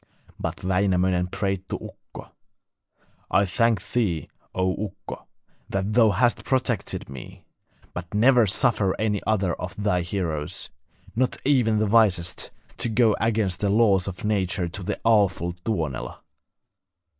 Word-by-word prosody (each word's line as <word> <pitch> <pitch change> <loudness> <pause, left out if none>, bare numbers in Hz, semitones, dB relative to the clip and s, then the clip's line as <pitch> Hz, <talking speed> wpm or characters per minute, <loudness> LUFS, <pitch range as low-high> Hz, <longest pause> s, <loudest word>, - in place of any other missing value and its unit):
But - - -4
Wainamoinen 90 -1 +2
prayed 95 0 -3
to - - -2
Ukko: - - -12 1.0
'I 100 - +3
thank 115 0 +1
thee, 90 - 0 0.3
O 95 +3 0
Ukko, 95 - -10 0.4
that 95 +2 -1
thou 115 -1 +6
hast 115 +5 +2
protected 125 -5 -1
me; 65 -1 -10 0.5
but 90 0 -7
never 120 +2 +5
suffer 100 -1 +1
any 105 -2 0
other 100 -5 +1
of 95 +3 -6
thy 100 -3 +1
heroes, 85 -7 -3 0.4
not 125 +2 +1
even 125 -6 +3
the 110 - +2
wisest, 100 -5 +2 0.3
to - - 0
go 110 -1 +3
against 110 -5 +1
the 100 - +1
laws 100 -3 +3
of 95 +1 -5
nature 95 -4 0
to 95 - -6
the 90 - -3
awful 100 -6 +3
Tuonela. 85 - -4
100 Hz, 135 wpm, -25 LUFS, 90-110 Hz, 1.0 s, thou